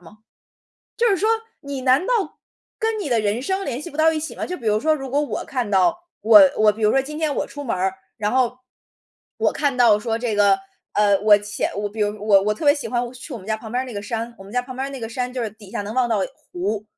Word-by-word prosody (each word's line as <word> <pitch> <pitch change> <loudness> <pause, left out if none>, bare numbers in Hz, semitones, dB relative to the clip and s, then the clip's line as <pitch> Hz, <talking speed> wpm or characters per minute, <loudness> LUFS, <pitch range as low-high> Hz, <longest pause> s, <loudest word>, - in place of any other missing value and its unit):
吗？ 215 +6 -16 0.8
就 475 0 +3
是 395 - +3
说 430 +4 +1 0.3
你 280 -2 -6
难 265 +7 +3
道 - - +2 0.6
跟 445 -1 -1
你 335 - -3
的 235 -3 +2
人 210 +3 0
生 380 +5 -1
联 255 +1 -3
系 345 - -7
不 290 - -11
到 320 +1 +4
一 310 - -1
起 320 - -5
吗？ - - -4
就 360 - -4
比 235 - -9
如 210 0 +3
说 315 +1 +3
如 270 -3 -6
果 285 +2 +2
我 295 - -3
看 245 -6 -3
到 185 -3 +3 0.2
我 215 0 +8 0.2
我 215 -1 +5
比 220 +1 -8
如 210 - +4
说 270 - +3
今 300 +3 -7
天 305 -3 0
我 - - -1
出 290 - -8
门 235 - -1
儿， 190 +1 0 0.2
然 210 0 -1
后 250 -1 +1 0.8
我 - - +2
看 280 -3 0
到 230 -4 +5
说 225 +1 -2
这 230 -3 -2
个， 200 -1 +5 0.4
呃， 205 -1 +4
我 210 0 +6
浅 205 0 -3 0.2
比 220 - -6
如 210 0 0
我 200 -2 +5
我 210 +1 +1
特 260 - -7
别 285 0 +6
喜 285 - -5
欢 245 0 0
我 240 - -8
去 255 +3 -10
我 235 - -5
们 190 - -14
家 220 0 0
旁 220 0 -10
边 250 +1 0
儿 - - -7
那 245 - -8
个 205 - -4
山 230 +2 -4
我 195 - -11
们 200 - -12
家 250 0 +1
旁 255 0 -9
边 265 +1 -2
儿 - - -6
那 270 - -7
个 225 - -4
山 250 +2 -3
就 250 -2 -3
是 220 - -3
底 205 -2 -15
下 235 - -3
能 205 +2 -6
望 250 -2 +2
到 215 -3 +1 0.3
湖， 200 +4 -2
240 Hz, 305 characters per minute, -22 LUFS, 210-275 Hz, 0.8 s, 我